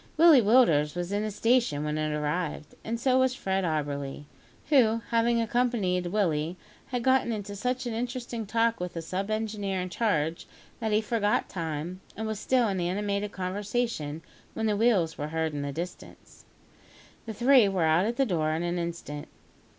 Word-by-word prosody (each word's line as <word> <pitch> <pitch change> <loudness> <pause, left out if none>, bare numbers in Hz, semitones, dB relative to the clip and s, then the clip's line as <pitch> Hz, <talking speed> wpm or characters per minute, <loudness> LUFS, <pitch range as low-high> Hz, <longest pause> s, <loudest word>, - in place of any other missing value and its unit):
Willie 320 -5 +8
Willders 200 - +4
was 175 +1 -3
in 205 +1 0
the 215 - -2
station 225 - +1
when 150 0 -2
it 155 0 -1
arrived, 150 +1 -2
and 230 +1 -3
so 260 +1 +3
was 260 -1 +2
Fred 190 -4 -1
Auberly, 145 -4 -2 0.5
who, 230 -6 +4
having 235 0 +3
accompanied 225 -6 0
Willie, 170 -4 0 0.3
had 245 -3 -3
got 260 -1 +3
into 205 -3 -4
such 250 +5 -2
an 240 - -3
interesting 240 -1 -4
talk 230 +2 +1
with 180 0 -4
the 165 - -3
sub 190 +5 -3
engineer 210 -3 -2
in 180 0 -3
charge, 165 -5 -1 0.3
that 220 -2 -2
he 210 +1 +3
forgot 210 -1 0
time, 165 +1 -4 0.2
and 220 - -3
was 220 -2 -3
still 250 -1 +2
in 190 -3 -1
animated 200 +3 -1
conversation 190 -4 -3 0.3
when 220 - -1
the 210 -1 +2
wheels 200 -7 +2
were 145 - -2
heard 160 0 -2
in 145 - -3
the 140 0 -3
distance. 170 +5 -8 0.8
The 220 - -4
three 245 -2 +5
were 190 -3 0
out 160 +5 +3
at 235 - -2
the 270 - +3
door 160 -7 0
in 160 +2 -1
an 175 0 -1
instant. 170 -4 -5
200 Hz, 180 wpm, -28 LUFS, 165-230 Hz, 0.8 s, Willie